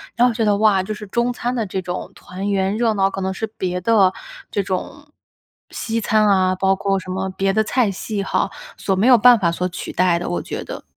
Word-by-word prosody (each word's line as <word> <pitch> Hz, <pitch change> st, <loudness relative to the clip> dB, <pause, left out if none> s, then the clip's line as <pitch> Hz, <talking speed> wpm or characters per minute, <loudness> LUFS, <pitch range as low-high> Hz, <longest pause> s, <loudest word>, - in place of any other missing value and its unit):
然 245 Hz, +1 st, +4 dB
后 245 Hz, -, 0 dB
觉 225 Hz, 0 st, -1 dB
得： 205 Hz, -2 st, +2 dB
“哇， 210 Hz, -2 st, +3 dB
就 190 Hz, -, -6 dB
是 210 Hz, 0 st, -6 dB
中 235 Hz, +4 st, 0 dB
餐 245 Hz, 0 st, -3 dB
的 230 Hz, -4 st, -2 dB
这 190 Hz, -, -3 dB
种 180 Hz, +1 st, -5 dB
团 190 Hz, +2 st, -6 dB
圆 195 Hz, 0 st, 0 dB
热 230 Hz, -2 st, +2 dB
闹， 195 Hz, -1 st, +2 dB
可 195 Hz, -, -5 dB
能 190 Hz, 0 st, -1 dB
是 205 Hz, +4 st, -3 dB
别 185 Hz, -4 st, -4 dB
的 200 Hz, -2 st, +4 dB, 0.4 s
这 200 Hz, -, 0 dB
种 240 Hz, +10 st, -5 dB, 0.6 s
西 230 Hz, 0 st, -3 dB
餐 215 Hz, 0 st, +2 dB
啊， 185 Hz, -2 st, +3 dB
包 190 Hz, +1 st, +2 dB
括 195 Hz, 0 st, 0 dB
什 185 Hz, -, -11 dB
么 190 Hz, +1 st, -2 dB
别 195 Hz, +1 st, -1 dB
的 220 Hz, +2 st, +2 dB
菜 240 Hz, 0 st, +1 dB
系 200 Hz, +1 st, -4 dB
哈， -, -, 0 dB, 0.3 s
所 195 Hz, -, -1 dB
没 195 Hz, +4 st, +1 dB
有 255 Hz, -2 st, +8 dB
办 240 Hz, +2 st, +7 dB
法 170 Hz, -4 st, +1 dB
所 180 Hz, +2 st, -2 dB
取 180 Hz, -, -6 dB
代 180 Hz, -1 st, +2 dB
的，” -, -, -4 dB
我 175 Hz, -, -2 dB
觉 -, -, -6 dB
得。 -, -, -8 dB
195 Hz, 255 characters per minute, -20 LUFS, 190-220 Hz, 0.6 s, 有